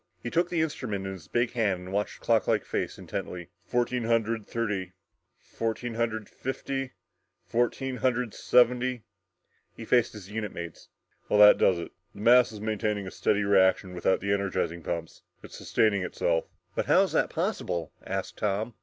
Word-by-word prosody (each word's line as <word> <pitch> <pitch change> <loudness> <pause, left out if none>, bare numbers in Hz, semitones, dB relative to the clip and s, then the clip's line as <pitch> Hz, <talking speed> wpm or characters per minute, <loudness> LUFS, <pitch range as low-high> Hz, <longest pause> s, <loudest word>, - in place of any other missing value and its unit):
He 120 - -4
took 170 +1 +2
the 170 -2 +1
instrument 110 -10 -3
in 95 - -4
his 85 -4 -11
big 120 +5 0
hand 105 -7 0
and 90 +1 -8
watched 105 +1 -2
the - - -18
clocklike - - +2
face - - -3
intently. 90 -2 -6
"... - - -41
fourteen 120 0 0
hundred 115 -1 0
thirty 105 -6 -2 0.4
fourteen 115 +1 -4
hundred 110 -2 -2
fifty 135 0 -4 0.5
fourteen 125 +2 -1
hundred 125 -2 0
seventy 125 -1 +3 0.3
" - - -43
He 115 - -7
faced 120 0 +3
his 105 -2 -10
unit 105 -2 -3
mates. 85 -1 -8 0.4
"Well, 105 - +3
that 105 0 +9
does 90 - +4
it. 85 - -6 0.2
The 100 - -9
mass 120 +1 +6
is 105 - -8
maintaining 105 -1 -1
a 95 - -6
steady 105 0 +1
reaction 95 -2 +3
without 90 +1 +1
the 100 +1 +1
energizing 95 -4 -1
pumps. 85 0 -5 0.2
It's - - -11
sustaining 105 -3 +1
itself!" 85 -2 0 0.3
"But - - -2
how - - +6
is - - -2
that - - +2
possible?" 85 -3 -2
asked - - -4
Tom. 105 +3 -1
110 Hz, 175 wpm, -28 LUFS, 95-120 Hz, 0.5 s, that